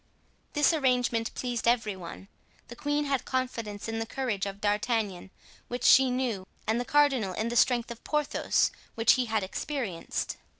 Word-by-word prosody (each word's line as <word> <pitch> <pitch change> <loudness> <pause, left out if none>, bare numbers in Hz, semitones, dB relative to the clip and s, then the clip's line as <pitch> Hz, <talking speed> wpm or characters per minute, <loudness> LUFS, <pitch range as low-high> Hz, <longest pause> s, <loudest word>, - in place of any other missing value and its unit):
This 295 +2 +4
arrangement 250 -6 +1
pleased 245 -2 -2
every 225 -4 +2
one. 185 +1 -9 0.4
The 240 - -8
queen 290 +3 -1
had 275 -2 0
confidence 230 -6 -3
in 225 0 -3
the 225 - -3
courage 225 -7 -2
of 195 0 -6
D'Artagnan, 205 -2 -1 0.4
which 245 0 -5
she 265 0 +7
knew, 245 -7 -2 0.2
and 225 +2 +1
the - - -4
cardinal 270 -9 +3
in 220 +5 -2
the 240 - -3
strength 240 -1 +3
of 235 - -9
Porthos, 300 -1 +1 0.2
which 225 0 +5
he 255 -1 +1
had 220 -2 0
experienced. 200 - -3
235 Hz, 165 wpm, -28 LUFS, 210-260 Hz, 0.4 s, she